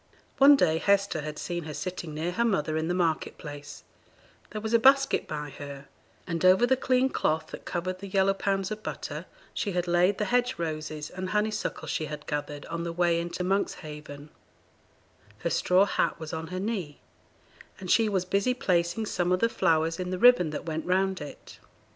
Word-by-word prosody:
One 280 +1 +9
day 160 - +2
Hester 200 -5 +2
had 150 0 -6
seen 175 -2 -4
her 155 -2 -6
sitting 175 -4 -5
near 165 +3 -2
her 230 +6 0
mother 155 -9 0
in 160 0 -1
the 175 - 0
market 165 -3 0
place; 145 -1 -9 0.7
there 215 - -5
was 220 +1 -4
a 230 - +6
basket 275 +3 +4
by 150 -1 -5
her, 140 -1 -8 0.4
and 170 -1 -3
over 185 +5 +6
the 260 +2 +3
clean 255 0 +2
cloth 160 -11 -1
that - - -9
covered 185 +1 -3
the 200 - -7
yellow 195 0 +2
pounds 195 0 -1
of 215 0 -4
butter, - - -6 0.3
she 200 - -2
had 180 0 -1
laid 175 +3 +3
the 210 - 0
hedge 250 +1 +2
roses 155 -2 -4
and 185 0 -5
honeysuckles 210 +1 -1
she 155 - -1
had 150 0 -7
gathered 145 0 -4
on 170 - -4
the 170 - -3
way 170 0 +2
into 170 +1 -3
Monkshaven; 150 -6 -3 1.1
her 170 - -2
straw 185 +2 +4
hat - - 0
was 160 +1 -7
on 160 0 -4
her 185 +2 -4
knee, 190 -8 -3 0.8
and 185 -2 -3
she 225 -2 +4
was 190 -3 0
busy 200 +7 +1
placing 175 -1 0
some 180 -3 -1
of 185 - +3
the 230 - +3
flowers 165 -4 +1
in 180 0 -3
the 185 - -2
ribbon 240 -6 +6
that 150 - -5
went 160 -1 -3
round 190 -1 +1
it. 145 - -10
180 Hz, 195 wpm, -28 LUFS, 160-200 Hz, 1.1 s, One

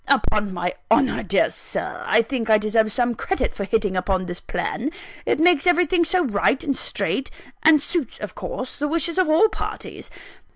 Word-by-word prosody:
Upon 215 -7 +1
my 175 0 -2 0.2
honour, 250 +4 +3
my - - -2
dear - - +1
Sir, - - -3
I 225 +1 +4
think 230 -2 -3
I 215 - +7
deserve 215 +1 +1
some 240 +2 +1
credit 385 - -2
for 200 - -4
hitting 205 -1 0
on 185 0 0
this 175 0 -5
plan 265 +6 -3 0.4
it - - +2
makes 345 -1 +4
everything 350 0 +3
so 360 +1 +1
right 245 +3 +1
and 280 -4 -1
straight, 270 - -2 0.3
and 320 -1 +6
suits 290 -2 -3
of 210 -3 -7
course 255 - -6
the 295 - 0
wishes 335 +3 0
of 370 - +2
all 325 +8 +5
parties! - - -6
255 Hz, 190 wpm, -22 LUFS, 210-320 Hz, 0.4 s, I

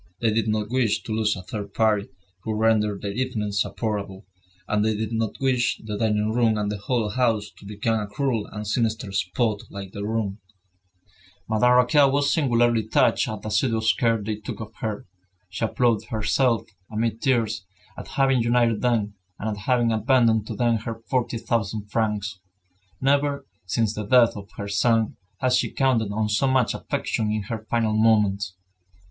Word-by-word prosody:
They 115 -2 +1
did 110 -1 0
not 105 0 -1
wish 125 -5 +1
to - - -7
lose 110 -1 +1
a 90 - -8
third 100 +1 -7
party 110 -2 +2 0.3
who 110 +1 -3
rendered 105 -2 +1
their 100 - -2
evenings 105 -4 -1
supportable; 100 -3 -3 0.4
and 105 -1 +1
they 110 0 +1
did 110 +1 -3
not 110 -1 -2
wish 130 -3 +1
the 105 -1 -4
dining 105 0 0
room 115 -2 +2
and 105 -1 -1
the 105 - -4
whole 115 +1 -1
house 110 -3 0
to 100 - -12
become 110 +2 -1
a 105 - -4
cruel 115 -1 -1
and 105 0 -7
sinister 110 -1 -1
spot 105 +3 0
like 100 -1 -8
their 100 - -6
room. 110 -2 -2 1.1
Madame 120 +3 +3
Raquin 135 +3 +5
was 140 +1 +2
singularly 120 -6 +2
touched - - +3
at 110 -2 -5
the 110 - -4
assiduous 110 +1 +2
care 115 -2 +1
they 105 +1 -3
took 105 - -7
of 110 0 -8
her. 110 -2 -4 0.4
She 105 +4 -2
applauded 115 -1 +1
herself, 115 +1 +1 0.3
amid 115 +1 -1
tears, 115 -7 0 0.3
at - - -9
having 135 -3 +2
united 115 -1 +2
them, 115 -4 +1 0.2
and 110 - -3
at 105 0 -7
having 120 -3 +3
abandoned 110 -1 +3
to - - -5
them 120 -2 +2
her 115 +1 -5 0.2
forty 125 -2 0
thousand 105 -2 -2
francs. 105 -4 -1 0.6
Never, 140 +1 +1 0.2
since 110 +3 0
the 105 -1 -5
death 120 0 +5
of 100 -1 -9
her 100 - -4
son, 110 +2 +1 0.2
had 130 0 +2
she 125 - +2
counted 120 -6 +1
on 105 +1 0
so 105 +6 +1
much 130 -3 +2
affection 110 -1 -2
in 105 -1 -1
her 110 0 -6
final 115 -2 +1
moments. 105 -4 +2
110 Hz, 175 wpm, -24 LUFS, 105-120 Hz, 1.1 s, Raquin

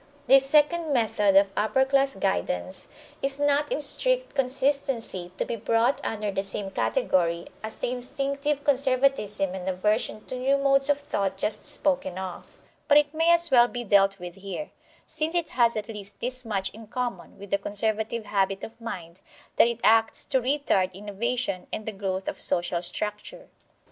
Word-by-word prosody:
This 270 +1 +6
second 305 +3 +3
method 215 -5 +2
of 195 0 +5
upper 265 +6 +2
class 275 0 +2
guidance 90 - -2 0.3
is 275 +1 +2
not 290 0 +1
in - - 0
strict - - +3
consistency 260 -8 -1
to - - -1
be - - -3
brought 230 +4 0
under 210 -2 -3
the 195 - -1
same 195 0 -3
category 175 - 0 0.2
as 220 0 -5
the - - -3
instinctive 275 +3 -3
conservatism 255 -8 +1
and 190 0 -4
aversion 210 +3 -1
to 255 - -5
new 270 +2 +2
modes 275 0 +2
of 290 - +3
thought 200 -10 -3
just 210 +2 -1
spoken 275 -9 -1
of; 190 -2 -8 0.3
but 290 - +6
it 295 0 +2
may 325 +2 +3
as 340 -2 +4
well 240 -2 +6
be 245 0 -6
dealt 195 -2 +3
with 175 0 -8
here, 195 +10 -7 0.3
since 315 +2 +1
it 340 -2 -1
has 235 -2 +2
at 210 -1 -4
least 205 -2 -4
this 255 +1 +2
much 195 -3 -2
in 225 0 -13
common 240 -5 -5
with 200 -1 -12
the 200 - +2
conservative 220 +2 -1
habit 195 -1 -1
of 230 +1 -10
mind 180 -6 -7 0.4
that - - +6
it 235 -1 -3
acts 225 0 +4
to 265 -2 0
retard 250 -8 +1
innovation 210 0 -3
and 215 - -5
the 220 - -3
growth 195 -2 -4
of - - -2
social 175 0 +3
structure. 210 - -5
230 Hz, 175 wpm, -26 LUFS, 195-275 Hz, 0.4 s, This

